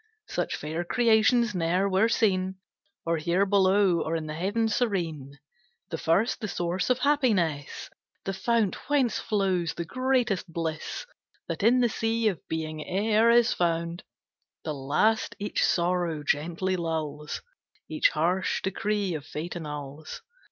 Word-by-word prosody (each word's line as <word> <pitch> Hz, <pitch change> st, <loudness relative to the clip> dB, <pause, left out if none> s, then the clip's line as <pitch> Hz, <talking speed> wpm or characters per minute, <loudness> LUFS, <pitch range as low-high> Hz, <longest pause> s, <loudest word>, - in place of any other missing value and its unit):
Such -, -, -2 dB
fair 160 Hz, +3 st, -3 dB
creations 230 Hz, +2 st, +3 dB
ne'er 180 Hz, +2 st, +1 dB
were 195 Hz, +4 st, +3 dB
seen, 190 Hz, -5 st, +1 dB, 0.5 s
Or 165 Hz, 0 st, +1 dB
here 170 Hz, +5 st, +1 dB
below, 190 Hz, -2 st, +3 dB
or 160 Hz, -, -2 dB
in 160 Hz, -1 st, -3 dB
the 155 Hz, -, -5 dB
heaven 205 Hz, +8 st, 0 dB
serene. 170 Hz, -, -2 dB, 0.5 s
The 165 Hz, -, -3 dB
first, 195 Hz, +11 st, +1 dB
the 210 Hz, -, -2 dB
source 175 Hz, +1 st, -2 dB
of 250 Hz, -, +3 dB
happiness, 215 Hz, -, +1 dB, 0.4 s
The 195 Hz, -, -2 dB
fount 230 Hz, +2 st, 0 dB
whence 275 Hz, -5 st, +2 dB
flows 185 Hz, -6 st, 0 dB
the 170 Hz, -, -4 dB
greatest 245 Hz, -5 st, 0 dB
bliss 160 Hz, -1 st, -4 dB, 0.4 s
That -, -, -4 dB
in 240 Hz, +4 st, +4 dB
the 240 Hz, -, +4 dB
sea 225 Hz, 0 st, 0 dB
of 185 Hz, -, -4 dB
being 155 Hz, -1 st, -3 dB
e'er 215 Hz, +6 st, +2 dB
is 235 Hz, 0 st, +5 dB
found; 170 Hz, 0 st, -1 dB, 0.6 s
The 155 Hz, -, -3 dB
last 150 Hz, +11 st, +1 dB
each 205 Hz, 0 st, -1 dB
sorrow 175 Hz, -3 st, +1 dB
gently 170 Hz, +6 st, 0 dB
lulls, 155 Hz, -3 st, -3 dB, 0.4 s
Each -, -, +3 dB
harsh 185 Hz, -, 0 dB
decree 200 Hz, 0 st, -1 dB
of 155 Hz, -3 st, -4 dB
Fate 155 Hz, +4 st, -6 dB
annuls. 150 Hz, -1 st, -7 dB
185 Hz, 140 wpm, -27 LUFS, 165-220 Hz, 0.6 s, is